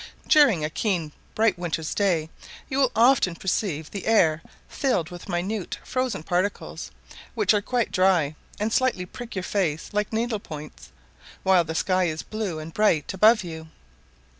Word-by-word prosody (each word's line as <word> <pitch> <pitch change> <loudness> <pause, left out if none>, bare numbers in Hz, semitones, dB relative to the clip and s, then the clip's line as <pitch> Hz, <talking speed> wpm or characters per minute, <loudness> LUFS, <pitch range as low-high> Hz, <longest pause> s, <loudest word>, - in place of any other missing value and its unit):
During 255 - +5
a - - -2
keen 175 -6 -1 0.2
bright 215 -5 +2
winter's 165 -2 -3
day 170 -6 0 0.4
you 265 - -2
will 265 -3 +3
often 230 -6 +4
perceive 170 -4 -2
the 200 - -6
air 165 -8 +4 0.3
filled 180 - -1
with 175 -1 -10
minute 185 +3 -2
frozen 255 -10 -2
particles, 180 +4 -2 0.5
which 420 - +3
are 205 - +2
quite 240 +2 -1
dry, 180 -6 +2 0.2
and 215 +2 -1
slightly 255 -8 +1
prick 235 +5 -9
your 185 - -2
face 175 -6 -1
like 210 0 -1
needle 225 0 -1
points, 150 - -10 0.5
while 190 -2 +5
the 160 0 -5
sky 185 +2 +2
is 160 -1 -3
blue 215 -6 -4
and 155 +1 -8
bright 180 -8 +2
above 215 +2 +5
you. 160 -2 -8
185 Hz, 160 wpm, -25 LUFS, 165-220 Hz, 0.5 s, During